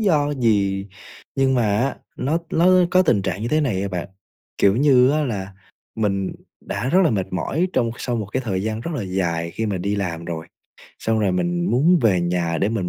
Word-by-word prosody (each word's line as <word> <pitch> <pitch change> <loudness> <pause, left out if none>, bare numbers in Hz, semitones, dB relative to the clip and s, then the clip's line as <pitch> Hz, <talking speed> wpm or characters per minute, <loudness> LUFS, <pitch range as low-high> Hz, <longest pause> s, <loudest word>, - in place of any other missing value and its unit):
do 155 -9 +2
gì, 100 -4 +1 0.5
nhưng 135 0 +3
mà 125 - +2 0.2
á 135 +4 0 0.2
nó 150 +6 0
nó 170 +2 +3 0.2
có 185 - +5
tình 115 - +2
trạng 95 +1 -3
như 115 - -2
thế 155 - +2
này 110 -11 0
à 100 - -2
bạn, 90 -2 -4 0.5
kiểu 100 +1 +4
như 130 -1 +5
á 150 +1 +1
là 100 -6 -4 0.4
mình 100 -3 -1 0.3
đã 125 - -3
rất 185 +6 +4
là - - +3
mệt 100 -5 -1
mỏi 160 - -1
trong 115 -2 +1
sau 120 -2 -2
một 110 -3 -3
cái 130 +6 -2
thời 95 -4 -1
gian 110 +1 -2
rất 170 - -5
là 125 - -2
dài 85 -3 -2
khi 110 +5 -3
mà 100 -3 -2
đi 100 +3 -1
làm 85 -4 -3
rồi, 80 -1 -5 0.5
xong 110 0 0
rồi 100 -3 +1
mình 175 - 0
muốn 160 +9 +4
về 95 -6 +3
nhà 85 -1 -1
để 100 - +1
mình 105 -6 -2
110 Hz, 220 wpm, -22 LUFS, 95-135 Hz, 0.5 s, có